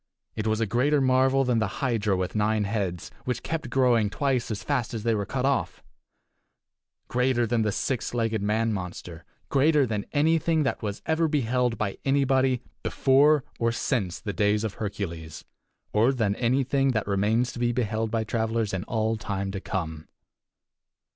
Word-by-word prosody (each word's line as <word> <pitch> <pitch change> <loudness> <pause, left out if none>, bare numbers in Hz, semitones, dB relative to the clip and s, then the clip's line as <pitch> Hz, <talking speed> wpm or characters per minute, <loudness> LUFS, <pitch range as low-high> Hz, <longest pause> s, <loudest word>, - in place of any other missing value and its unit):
It 110 0 -2
was 110 0 +1
a 115 - +2
greater 135 +8 +2
marvel 130 +1 +3
than 125 -3 +1
the 110 - -2
hydra 110 -7 +1
with 90 -1 -2
nine 105 0 +1
heads, 100 -5 -3
which 125 -2 -3
kept 160 -6 -3
growing 120 -4 +3
twice 130 +1 -1
as 105 -3 -4
fast 130 -5 -1
as 110 - -4
they 115 0 +2
were 100 -3 -2
cut 130 +3 -2
off; 140 0 -1 1.2
greater 125 -1 +1
than 115 0 +1
the 105 -1 +1
six 125 +3 -2
legged 115 -3 0
man 110 +2 +1
monster; 90 -3 -6 0.2
greater 145 +1 +4
than 105 -3 -3
anything 160 +1 +2
that 135 - -1
was 105 -3 -4
ever 160 +1 +2
beheld 125 -5 0
by 100 -2 -3
anybody 135 -2 +2 0.2
before 140 +2 +4 0.2
or 115 0 +2
since 105 -7 -1
the 100 - -4
days 105 +3 +1
of 110 -3 -2
Hercules, 85 -7 -5 0.5
or 115 +5 +4
than 110 -6 0
anything 135 +2 +1
that 110 -2 0
remains 105 +5 +1
to - - -8
be 120 0 +2
beheld 110 -2 -1
by 110 0 0
travelers 110 -1 -1
in 95 -1 -2
all 110 0 0
time 100 -2 -3
to 95 -1 -5
come. 80 -6 -4
115 Hz, 170 wpm, -26 LUFS, 105-130 Hz, 1.2 s, greater